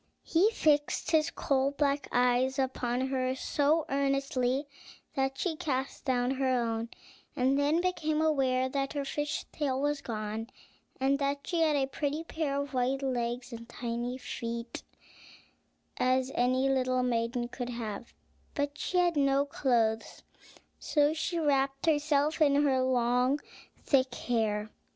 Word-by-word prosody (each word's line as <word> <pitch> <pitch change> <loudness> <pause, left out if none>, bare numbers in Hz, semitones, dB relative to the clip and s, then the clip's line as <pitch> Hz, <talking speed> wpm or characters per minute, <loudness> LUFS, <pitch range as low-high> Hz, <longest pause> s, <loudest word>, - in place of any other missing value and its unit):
He 360 +6 +3
fixed 300 -10 +1
his 315 -1 +3
coal 275 0 0
black 285 0 +1
eyes 250 +2 +2
upon 260 -1 -1
her 260 -1 0
so 295 +4 +1
earnestly 275 -1 0 0.5
that 270 0 0
she 325 +4 -1
cast 270 -2 -3
down 250 -2 +1
her 270 0 0
own, 230 -2 0 0.5
and 260 +2 +2
then 290 +4 +2
became 315 -4 0
aware 265 -5 +2
that 275 +1 -2
her 285 -1 -2
fish's 295 +2 -2
tail 270 -4 -1
was 290 0 0
gone, 220 -1 -4 0.5
and 270 +1 +2
that 280 0 -1
she 340 -2 0
had 310 -2 +3
as 270 -2 +1
pretty 295 +2 -2
a - - -11
pair 295 -4 -2
of 280 -1 -4
white 260 +2 0
legs 245 -1 -2
and 230 0 -9
tiny 240 +1 -3
feet 235 -2 -5 1.2
as 255 +1 +1
any 255 +2 +2
little 255 -1 +1
maiden 240 0 0
could 245 0 -5
have; 235 -2 -5 0.4
but 285 -1 -1
she 365 - -1
had 350 -2 +3
no 275 -1 +3
clothes, 230 -6 0 0.6
so 295 0 +2
she 335 +2 -2
wrapped 275 -3 +1
herself 300 0 +2
in 285 -1 +4
her 265 -3 +2
long, 250 +2 +2 0.5
thick 260 -3 +2
hair. 215 -3 -1
270 Hz, 145 wpm, -30 LUFS, 245-290 Hz, 1.2 s, in